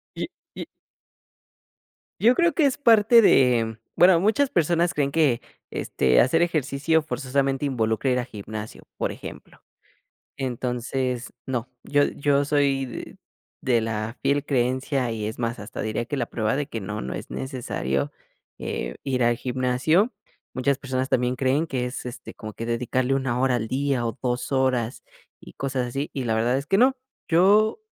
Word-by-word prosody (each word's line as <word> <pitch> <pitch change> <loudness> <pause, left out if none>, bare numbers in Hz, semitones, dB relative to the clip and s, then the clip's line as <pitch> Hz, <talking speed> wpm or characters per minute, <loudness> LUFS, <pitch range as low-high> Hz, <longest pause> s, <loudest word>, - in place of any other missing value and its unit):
Y - - -3 0.3
y. - - -5 1.5
Yo 240 +4 +5
creo 340 +2 +3
que 315 - +3
es 275 - +2
parte 230 -3 +6
de 120 - +4 0.2
bueno, 180 -1 +6
muchas 220 +9 +2
personas 170 -1 +2
creen 140 -2 0
que, 140 -6 +2 0.3
este, 65 -1 +2
hacer 165 +7 +3
ejercicio 155 -1 +1
forzosamente 135 -2 -1
involucra 115 -1 0
ir 125 0 +2
a 120 - -2
gimnasio, 110 -1 -8
por - - -1
ejemplo. - - -10 0.8
Entonces, 125 0 -2
no, 125 -2 -2
yo 145 0 +2
yo 145 0 +1
soy 140 -2 +2
d 125 - -8 0.4
de 120 -3 +2
la 110 +1 -3
fiel 145 +1 +1
creencia 130 -1 0
y 110 -2 -3
es 110 +3 -5
más, 115 0 -1
hasta 105 - -7
diría 110 +2 -2
que 140 +4 -3
la 120 -3 -1
prueba 110 0 -1
de 145 0 -2
que 115 - -5
no, 105 +2 -4
no 65 - -4
es - - -8
necesario, 120 - -2 0.5
eh, - - -4
ir 130 -2 0
al 120 0 +3
gimnasio. 130 - +1 0.4
Muchas 130 +1 +1
personas 130 -1 -2
también 125 -1 +1
creen 135 +5 +1
que 130 -5 -2
es, 125 +1 -6
este, 125 0 -8
como 110 -1 -8
que 115 - -6
dedicarle 125 +2 0
1 130 -3 -1
hora 130 -1 +2
al 115 -2 -2
día 135 -1 0
o 115 +3 -3
2 125 +1 -2
horas 130 -3 0 0.4
y - - -14
cosas 130 -2 -2
así, 135 +4 -4
y 135 -3 -3
la 110 -1 +1
verdad 120 +3 +2
es 140 - -4
que 195 - +3
no. 260 +4 +5 0.3
Yo, 205 - +4
130 Hz, 170 wpm, -24 LUFS, 120-145 Hz, 1.5 s, parte